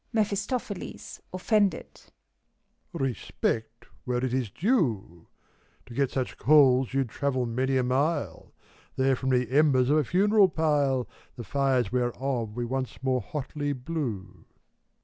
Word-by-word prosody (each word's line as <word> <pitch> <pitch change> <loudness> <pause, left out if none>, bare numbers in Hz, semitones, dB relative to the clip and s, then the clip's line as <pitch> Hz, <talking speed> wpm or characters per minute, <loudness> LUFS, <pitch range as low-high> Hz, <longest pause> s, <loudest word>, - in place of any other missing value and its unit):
MEPHISTOPHELES 210 0 -3
(offended). 200 0 0 0.9
Respect, 120 -2 -3 0.2
where 125 0 -1
it 125 - -3
is 130 -4 -1
duel 120 - -1 0.6
To 120 - -12
get 135 +1 +1
such 130 -2 -3
coals, 135 -4 +5
you'd 135 -2 0
travel 130 0 -1
many 130 +3 0
a 130 - +2
mile: 130 - -1 0.4
They're 130 0 +2
from 130 +1 -3
the 125 -1 +1
embers 135 -2 +4
of 150 - +4
a 155 - +3
funeral 200 - +4
pile. 145 -6 +1 0.3
The 120 - -7
fires 130 -5 0
whereof 120 -2 -2
we 120 0 -2
once 130 +1 -4
more 130 -1 +1
hotly 145 +4 -4
blew. 125 - -5
130 Hz, 130 wpm, -27 LUFS, 125-150 Hz, 0.9 s, coals